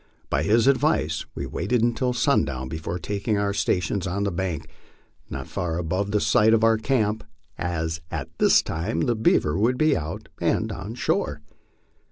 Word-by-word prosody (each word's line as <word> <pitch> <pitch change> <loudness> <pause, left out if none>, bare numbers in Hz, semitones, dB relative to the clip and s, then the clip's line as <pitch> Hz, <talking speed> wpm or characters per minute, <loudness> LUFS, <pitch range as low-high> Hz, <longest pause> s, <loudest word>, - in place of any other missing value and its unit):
By 70 - +2
his 110 +8 +3
advice 135 - +2
we - - -3
waited 110 +7 0
until 120 +2 +1
sundown 75 - +1
before 80 +3 -4
taking 100 +4 -2
our 100 0 0
stations 95 0 0
on 100 +3 -1
the 100 - 0
bank, 85 -3 -3 0.6
not - - -5
far 85 -2 -3
above 90 +4 -1
the 105 +1 +1
site 110 +2 +4
of 110 - +1
our 115 -1 +4
camp, 110 -3 0 0.3
as 80 -2 -2
at - - -6
that - - +5
time 85 +8 -2
the 120 - +2
beaver 95 -6 +2
would 120 +4 +2
be 155 0 +3
out 80 +1 -5
and - - +1
on 105 +5 -6
shore. 75 -10 -1
100 Hz, 170 wpm, -24 LUFS, 80-115 Hz, 0.6 s, that